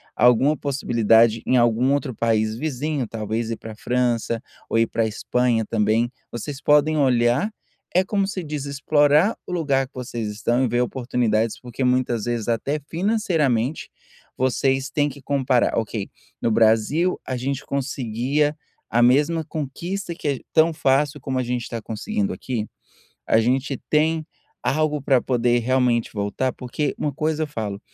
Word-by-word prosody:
alguma 125 +6 +4
possibilidade 115 -5 +3
em 130 - +2
algum 120 +3 +3
outro 140 -2 -1
país 110 -1 +1
vizinho, 145 -1 -2
talvez 110 +1 -3
ir - - -1
para 110 - -9
França, 120 -1 0 0.3
ou - - +1
ir 115 - +4
para 115 0 0
Espanha 120 +1 0
também, 110 +2 +1 0.2
vocês 135 +4 -6
podem 150 +1 +4
olhar, 130 - +2 0.4
é 185 - +5
como 195 0 0
se 195 -3 -4
diz: 150 -2 -4
"Explorar 145 +6 +3
o - - -6
lugar 140 -6 +1
que - - -38
vocês 120 -3 -4
estão 120 +4 0
e - - +1
ver 120 +1 +1
oportunidades, 120 -3 0
porque 125 +1 -5
muitas 125 -3 +1
vezes 120 -2 -2
até 140 +6 -1
financeiramente 165 - 0 0.5
vocês 130 +1 +1
têm 145 -1 +1
que 140 0 -11
comparar, 130 -3 +1
ok, 110 -2 -2 0.3
no 115 - +1
Brasil 115 +11 +3
a 130 - -3
gente 135 +2 -3
conseguia 140 +2 -1 0.3
a 120 - +2
mesma 145 +7 +3
conquista 170 +6 -4
que 155 - -5
é 140 -3 0
tão 160 0 +4
fácil 145 0 +1
como 130 -1 -2
a - - 0
gente 125 0 -2
está 115 -1 -5
conseguindo 205 - -2
aqui? 115 -5 -4 0.6
A 110 - +4
gente 130 +4 0
tem 155 +1 +2 0.4
algo 150 +1 +1
para 135 -2 +3
poder 120 -1 +2
realmente 125 -1 +1
voltar"? 105 +5 -1
Porque 130 +4 -3
uma 145 - -1
coisa 155 +2 -1
eu - - -5
falo, 105 -8 -4
130 Hz, 155 wpm, -23 LUFS, 115-150 Hz, 0.6 s, é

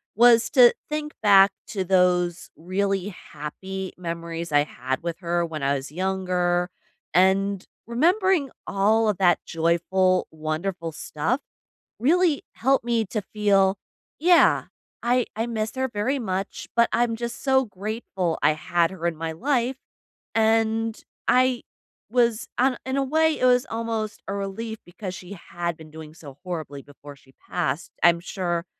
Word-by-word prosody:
was 235 0 +6
to 250 -3 +7 0.2
think 300 0 -3
back 195 -1 +7 0.2
to 195 -4 -2
those 180 -2 +2
really 195 +3 -1 0.2
happy 190 +6 -6
memories 170 -1 -5
I 145 0 +4
had 130 -1 -4
with 170 -1 -3
her 175 -1 0
when 155 -3 -6
I 140 +1 +2
was 135 0 -4
younger 180 0 0 0.4
and 190 +1 +3 0.2
remembering 345 - +2 0.2
all 215 +3 +2
of 205 - 0
that 180 -3 +4
joyful, 175 +3 +1
wonderful 165 +2 -3
stuff 195 - -2 0.6
really 320 +4 +3
helped 265 0 +1
me 230 -2 +1
to 210 +2 -3
feel 200 -2 +3 0.4
Yeah, 345 +2 +5 0.4
I 245 +1 +2
I 225 +2 -1
miss 220 -2 -2
her 260 0 0
very 245 +5 -1
much 195 -3 -4
but 235 0 +4
I'm 235 -1 +1
just 235 +1 -5
so 265 -1 +4
grateful 195 -4 -3
I - - +6
had 165 +2 0
her 170 -3 -3
in 170 - -2
my 165 0 -4
life 255 - 0 0.6
and 225 0 +1 0.3
I 255 -1 +3 0.5
was 235 -2 +2
an 255 0 +2
in 260 +1 -2
a 275 - +2
way, 315 +3 +2
it - - +2
was 250 0 +4
almost 225 -1 -3
a 195 - -3
relief 210 +3 -4
because 180 +1 -7
she 190 +1 -9
had 170 -1 -3
been 155 -1 -13
doing 155 -1 -10
so 145 -5 -12
horribly 155 -6 -5
before 145 0 -13
she 135 -1 -23 0.2
passed. 140 +5 -2
I'm 170 -1 +6
sure 175 -1 -3
195 Hz, 150 wpm, -24 LUFS, 170-235 Hz, 0.6 s, to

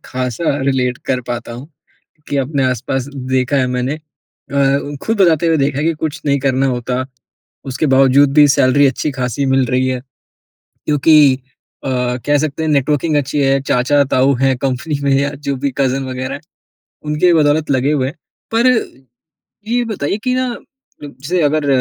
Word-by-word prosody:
ख़ासा 130 +4 -2
रिलेट 130 -2 0
कर 130 -1 0
पाता 120 -1 -4
हूँ 125 +5 -9 0.6
कि 145 - -2
अपने 135 0 0
आसपास 130 +1 -3
देखा 130 +1 -1
है 130 - +2
मैंने। 125 +2 -2
अ, 140 -2 -3
ख़ुद 220 -2 -1
बताते 170 -2 +3
हुए 165 -1 +3
देखा 140 -1 0
है 150 - -1
कि 165 - +2
कुछ 155 -1 -3
नहीं 140 0 +2
करना 135 0 +1
होता 125 0 -2 0.7
उसके 135 +4 -1
बावजूद 135 +1 +4
भी 150 0 +6
सैलरी 140 0 +4
अच्छी-ख़ासी 135 -1 -2
मिल 135 -1 +3
रही 130 +2 0
है 130 -1 -1 0.9
क्योंकि, 150 -1 +5 0.5
अ, - - -3 0.4
कह 145 0 +3
सकते 155 +1 -2
हैं 160 - -1
नेटवर्किंग 150 +2 +1
अच्छी 145 +1 -1
है 135 0 +2
चाचा-ताऊ 135 +1 +2
हैं 135 -1 +3
कंपनी 135 +3 -2
में 140 - +1
या 140 +1 0 0.2
जो 140 - 0
भी 140 - +1
कज़न 135 0 0
वग़ैरह 130 0 -4
है। 145 - -10 0.7
उनकी 170 +4 +3
बदौलत 150 -1 +2
लगे 135 +2 +1
हुए 135 -4 0
हैं। 145 - -8 0.4
पर 235 +2 +3 1.0
ये 240 +1 +1
बताइए 200 -5 -2
कि 255 -1 +1
ना 255 0 0
अ, 265 - -14
जैसे 145 +6 -3
अगर 150 0 +1
140 Hz, 170 wpm, -16 LUFS, 130-150 Hz, 1.0 s, भी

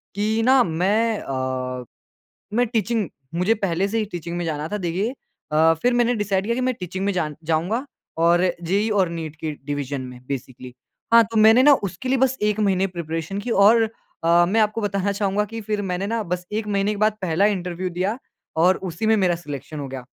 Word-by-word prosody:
कि 215 +2 0
ना 260 0 +6
मैं 205 +6 +1
अ, 130 -1 -3 0.7
मैं 245 +1 +3
टीचिंग 220 -3 -1 0.3
मुझे 180 +6 +2
पहले 195 -2 -1
से 225 +3 -1
ही 215 - +1
टीचिंग 170 0 -5
में 175 - -2
जाना 155 -1 -3
था 210 - -3
देखिए 190 +8 -2 0.4
अ, 160 +1 +5
फिर 245 - +3
मैंने 240 0 +3
डिसाइड 200 -3 0
किया 235 +2 0
कि 255 - -2
मैं 255 0 0
टीचिंग 185 +2 -4
में 200 - +1
जान 155 -5 -2 0.2
जाऊँगा 200 - 0 0.3
और 170 +2 +4 0.2
जेईई 200 +6 +1
और 195 -4 +2
नीट 160 -2 -6
की 155 0 -4
डिवीज़न 145 -1 -3
में 125 -1 -9
बेसिकली। 130 -2 -6 0.4
हाँ, 230 - +9
तो 225 +1 -7
मैंने 220 +3 +7
ना 290 0 +8
उसके 190 +8 -7
लिए 265 0 +2
बस 265 0 +2
1 210 0 +1
महीने 195 -2 +2
प्रिपरेशन 165 +3 -4
की 245 - -5
और 220 +2 +5 0.4
अ, 170 +1 +5
मैं 225 +3 +2
आपको 215 +1 +1
बताना 200 -1 -1
चाहूँगा 200 0 0
कि 225 +2 -7
फिर 210 -1 -2
मैंने 190 +3 -2
ना 230 +1 -1
बस 180 0 -3
1 215 0 -2
महीने 200 0 0
के - - -4
बाद 215 - +2
पहला 185 +2 +2
इंटरव्यू 180 0 -4
दिया 190 +7 -2 0.4
और 185 +2 +5 0.2
उसी 215 +7 -3
में 220 - +4
मेरा 185 -4 +2
सिलेक्शन 150 -2 -7
हो 140 - -4
गया। 130 -1 -7
195 Hz, 210 wpm, -22 LUFS, 165-220 Hz, 0.7 s, हाँ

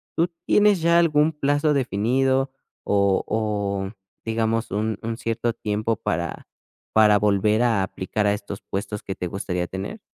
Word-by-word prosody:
¿Tú 170 +2 +2 0.2
tienes 205 -4 +4
ya 170 +1 +4
algún 155 -1 +3
plazo 145 +1 +1
definido, 130 +2 +1 0.3
o 100 -1 +2
o, 100 -3 -1 0.3
digamos, 115 0 -1
un 110 0 -1
un 115 0 -3
cierto 115 0 -1
tiempo 105 +1 -2
para 85 0 -3 0.5
para 105 -1 +6
volver 105 +2 +2
a 115 -5 +2
aplicar 95 +3 -2
a 100 - +3
estos 100 -1 -6
puestos 100 +1 -5
que 95 - -5
te 90 - -4
gustaría 90 -1 -3
tener? 95 - -6
110 Hz, 150 wpm, -23 LUFS, 100-130 Hz, 0.5 s, para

